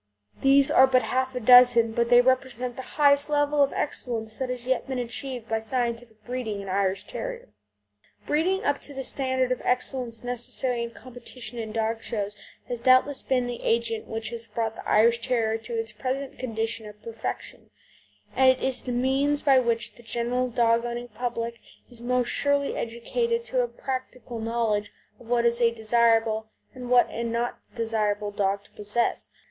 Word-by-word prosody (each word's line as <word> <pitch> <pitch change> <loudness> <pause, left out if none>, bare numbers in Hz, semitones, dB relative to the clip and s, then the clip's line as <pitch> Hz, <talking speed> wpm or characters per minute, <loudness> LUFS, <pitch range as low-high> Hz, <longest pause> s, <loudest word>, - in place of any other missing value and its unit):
These 275 0 +5
are 265 - +7
but 255 -2 +3
half 260 +3 -1
a - - -1
dozen, 245 -1 +7
but 235 +1 0
they 245 0 +7
represent 250 -1 0
the - - -5 0.2
highest 285 -1 +4
level 290 0 +2
of 280 - +4
excellence 225 -6 -3
that 260 -1 -2
has 250 -1 -4
yet 260 0 0
been 265 -1 -3
achieved 245 0 -5
by 225 -1 0
scientific 230 -1 -3
breeding 240 -4 -3
in 200 - -7
Irish 195 0 0
Terrier - - -5
type. - - -25 0.7
Breeding 360 +6 +1
up 285 0 0
to 285 - -8
the 265 - -4
standard 260 -2 0
of 255 - -1
excellence 250 -2 -1
necessary 245 0 -2
in 235 - -3
competition 245 0 -9
in 220 -1 -5
dog 225 0 -1
shows 205 -3 -3 0.3
has 240 -1 -4
doubtless 255 +3 +4
been 255 -2 0
the 245 -1 -5
agent 230 -1 0
which 225 0 -4
has 230 -1 -6
brought 225 0 -2
the - - -7
Irish 235 +2 +4
Terrier 230 -2 0
to 230 +2 -8
its 225 0 -3
present 265 +5 -4
condition 225 -2 -3
of 210 0 -12
perfection, 230 -1 -6 0.7
and 265 0 +6
it 260 - +3
is 265 -1 0
the 250 - -5
means 270 +4 +1
by 270 -3 +6
which 235 -2 -1
the - - -14
general 240 +3 -1
dog 235 -1 +2
owning 240 0 -4
public 235 0 -4 0.3
is 235 -1 -12
most 250 0 +1
surely 285 0 +1
educated 465 - -2
to - - 0
a - - 0
practical 255 - -6
knowledge 220 -2 -1 0.3
of 240 - -15
what 235 0 +2
is 235 +1 +2
a 235 - +6
desirable 225 -1 +2 0.2
and 250 -2 -8
what 245 -1 +5
an 230 0 -3
undesirable 220 -3 -2
dog 200 0 -1
to - - -23
possess. 210 +3 -1
240 Hz, 180 wpm, -26 LUFS, 225-260 Hz, 0.7 s, are